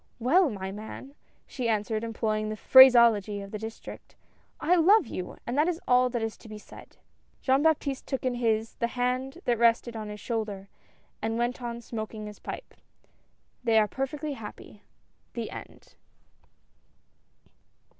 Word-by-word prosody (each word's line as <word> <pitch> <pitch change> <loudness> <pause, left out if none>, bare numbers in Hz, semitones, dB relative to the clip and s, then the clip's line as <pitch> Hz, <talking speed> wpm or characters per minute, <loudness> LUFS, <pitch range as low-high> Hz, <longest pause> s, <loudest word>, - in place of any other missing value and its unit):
"Well, 295 +8 +3
my 190 -4 -5
man," 220 +6 -9 0.3
she 245 -3 -3
answered, 215 0 -1
employing 215 -1 -2
the 215 - -3
phraseology 235 -5 +7
of 200 0 -9
the 215 - -5
district, 220 +1 -9 0.2
" - - -39
I 350 - +2
love 380 +5 +5
you 180 - -5
1 - - -12
and 240 - -3
that 305 - +4
is 345 -2 -1
all 250 0 +4
that 240 -2 -2
is 225 -1 -4
to 225 - -15
be 215 - -8
said." 210 - -14 0.5
Jean 265 +1 +3
Baptiste 290 -3 0
took 265 -2 -3
in 255 - +1
his, 225 -2 0
the 235 - 0
hand 250 +4 -2
that 240 -2 +1
rested 235 0 +3
on 215 -1 -5
his 210 0 -7
shoulder, 210 -4 -4 0.5
and 225 +1 -1
went 240 +2 -1
on 235 -1 -5
smoking 220 -2 -6
his 210 0 -10
pipe. - - -8 0.9
They 230 -2 +3
are 215 -1 +4
perfectly 285 +5 -4
happy. 210 -3 -10 0.5
THE - - -5
END. - - -11
235 Hz, 165 wpm, -28 LUFS, 215-260 Hz, 0.9 s, phraseology